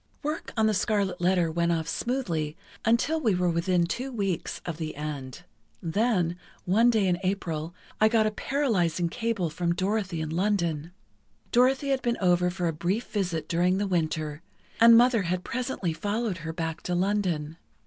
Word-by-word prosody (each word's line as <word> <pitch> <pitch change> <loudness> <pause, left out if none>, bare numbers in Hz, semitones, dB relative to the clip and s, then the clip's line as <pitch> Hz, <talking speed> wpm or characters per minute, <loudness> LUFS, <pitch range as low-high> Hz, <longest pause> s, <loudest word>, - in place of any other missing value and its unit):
"Work 305 +2 -3
on 220 - +4
'The 215 - +3
Scarlet 195 -3 0
Letter' 175 -2 +2
went 170 +1 +1
off 165 -1 -1
smoothly 170 - -2 0.3
until 260 +8 +2
we 220 -9 +2
were 180 -1 +1
within 170 +1 +2
two 255 +9 -4
weeks 195 -7 -2
of 170 -3 -4
the 160 -2 -4
end. 140 -3 -6 0.4
Then, 180 -1 0 0.3
one 220 +6 +4
day 220 -4 +3
in 175 -1 +1
April, 175 -4 -2 0.2
I 215 - +6
got 220 -1 +3
a 215 - +1
paralyzing 185 - 0
cable 225 -5 -1
from 170 +2 -1
Dorothy 195 -2 -1
in 155 0 -3
London. 170 -4 0 0.6
Dorothy 260 +3 +3
had 270 -1 +1
been 240 -1 0
over 180 -1 +3
for 180 -1 -2
a 165 - 0
brief 180 +9 -2
visit 175 -7 -1
during 180 +2 +2
the 205 - 0
Winter, 155 -4 -1 0.4
and 230 0 +9
Mother 240 -2 +5
had 180 0 -2
presently 245 -9 -2
followed 205 +3 -2
her 160 0 -5
back 160 -1 -4
to 180 - -2
London. 175 -5 0
180 Hz, 170 wpm, -27 LUFS, 165-220 Hz, 0.6 s, and